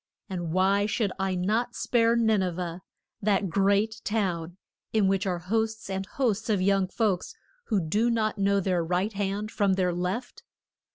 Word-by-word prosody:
And 175 -3 -3
why 195 +3 +3
should 215 -2 0
I 190 -1 0
not 220 +7 0
spare 230 -1 +2
Nin 220 -3 +3
e 185 - +1
veh 175 0 -5 0.4
that 200 -3 +1
great 200 +4 +2
town 180 -5 -2 0.3
in 215 -3 +3
which 195 0 +1
are 180 -2 0
hosts 220 +3 -2
and 190 0 -3
hosts 225 -5 -1
of 210 -3 +2
young 195 0 +2
folks 195 -2 -1 0.3
who 215 -4 +1
do 205 +8 +1
not 215 -2 0
know 200 0 +3
their 180 -3 0
right 180 +5 0
hand 200 +2 -2
from 200 -2 +2
their 185 -2 +1
left? 185 +8 -3
195 Hz, 170 wpm, -27 LUFS, 185-220 Hz, 0.4 s, why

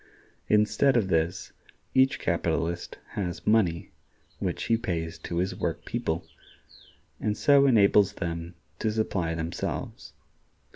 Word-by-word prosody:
Instead 105 +5 +3
of 100 -5 +1
this, 85 +1 0 0.4
each 130 0 +4
capitalist 85 +1 -1
has 90 -3 -4
money, 95 -7 +2 0.5
which - - -2
he 115 - +2
pays 85 -8 -3
to 85 - -5
his 90 +2 0
work 85 -2 -3
people, 80 +1 -2 0.9
and 105 -1 -1
so 140 -1 +5
enables 105 -4 +5
them 85 -2 -5 0.2
to 110 - 0
supply 95 -6 -1
themselves. 80 +1 -4
95 Hz, 115 wpm, -27 LUFS, 85-110 Hz, 0.9 s, so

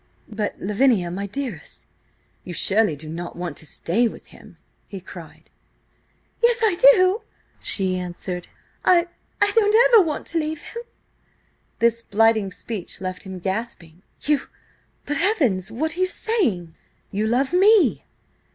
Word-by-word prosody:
"But, 210 -1 -3
Lavinia, 210 -3 +1
my 200 +3 -4
dearest! 270 +4 -6 0.6
You 180 - -7
surely 200 -1 +3
do 150 +2 -10
not 170 +2 -6
want 175 -4 -5
to 160 - -8
stay 225 +12 0
with - - -9
him?" 210 -6 -16 0.3
he 195 - -8
cried. 175 -3 -13 0.9
"Yes 475 0 +4
I 425 -5 +3 0.2
do!" 370 +4 +2 0.4
she 190 -2 +1
answered. 180 0 -5 0.4
"I–I 350 +3 +1
don't 450 0 +5
want 300 - -4
ever - - -6
to 335 - 0
leave 310 -1 -4
him!" 470 - -7 1.0
This 230 0 +2
blighting 220 -2 +2
speech 205 0 -6
left 185 0 -5
him 190 -1 -7
gasping. 190 -3 -5 0.2
"You–but–heavens! 290 - -1
what 315 +7 -2
are - - -7
you 370 - +2
saying? 275 - -1 0.4
You 210 +2 -1
love 265 +7 0
me!" 400 +2 +4
225 Hz, 135 wpm, -22 LUFS, -, 1.0 s, don't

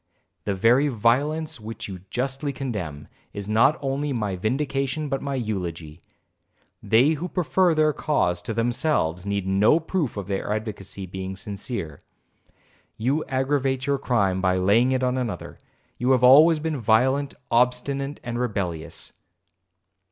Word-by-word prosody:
The 100 - -1
very 120 +8 +4
violence 140 +6 0
which 110 +1 -7
you 95 -3 -7
justly 135 +4 -2
condemn, 100 - -5 0.3
is 100 -1 -6
not 115 +8 +4
only 140 +2 -1
my 105 -6 -2
vindication 135 - -1
but 135 -1 -2
my 140 -1 -3
eulogy. 85 - -4 0.8
They 125 +7 +4
who 165 +3 -3
prefer 180 +1 +2
their 155 -1 +3
cause 90 - 0
to 115 - -4
themselves, 115 - 0
need 100 -1 -1
no 100 +11 +4
proof 160 - -2
of 100 - -4
their 100 +1 -3
advocacy 105 -3 -5
being 95 +1 -6
sincere.' 100 - -6 1.0
'You 135 +8 0
aggravate 135 0 0
your 140 -1 0
crime, 100 -8 +1
by 95 0 +2
laying 105 +7 +3
it 130 0 0
on 125 0 +1
another; 120 -4 -5 0.4
you 125 +2 +3
have 125 -1 +2
always 155 +6 +8
been 155 0 -2
violent, 130 +6 +2 0.2
obstinate, 125 +4 +1
and 120 0 -4
rebellious.' 90 -9 -4
120 Hz, 140 wpm, -24 LUFS, 100-140 Hz, 1.0 s, always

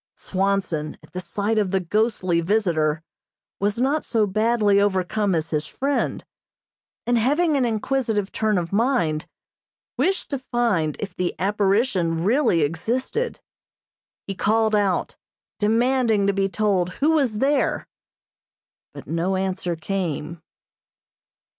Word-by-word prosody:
Swanson, 185 -6 -1
at 180 - -7
sight 205 +5 -1
of 205 -3 0
the 190 +1 +1
ghostly 185 -2 0
visitor, 165 -5 +1 0.6
was 205 +2 0
not 280 +5 +1
so 225 -3 +1
badly 210 0 +2
overcome 200 0 +1
as 160 0 -2
his 155 -1 -1
friend, 280 +1 -2 0.8
and 240 0 +2
having 295 +7 +2
an 265 -3 +2
inquisitive 225 -3 -1
turn 215 -2 +1
of 170 +1 -3
mind, 200 - +1 0.7
wished 360 +9 0
to 275 - -1
find 230 - 0
if 195 -3 -5
the 180 -1 -2
apparition 195 -3 +1
really 225 - +3
existed. 240 - -1 0.9
He 195 - -4
called 220 +3 +1
out, 200 -3 +1 0.4
demanding 225 -1 +2
to 200 - +2
be 195 0 0
told 190 -4 0
who 300 +3 +2
was 270 -9 +1
there, 275 +4 +1 1.1
but - - -9
no 170 +4 -1
answer 185 -2 -2
came. 170 -2 -3
205 Hz, 120 wpm, -23 LUFS, 180-235 Hz, 1.1 s, really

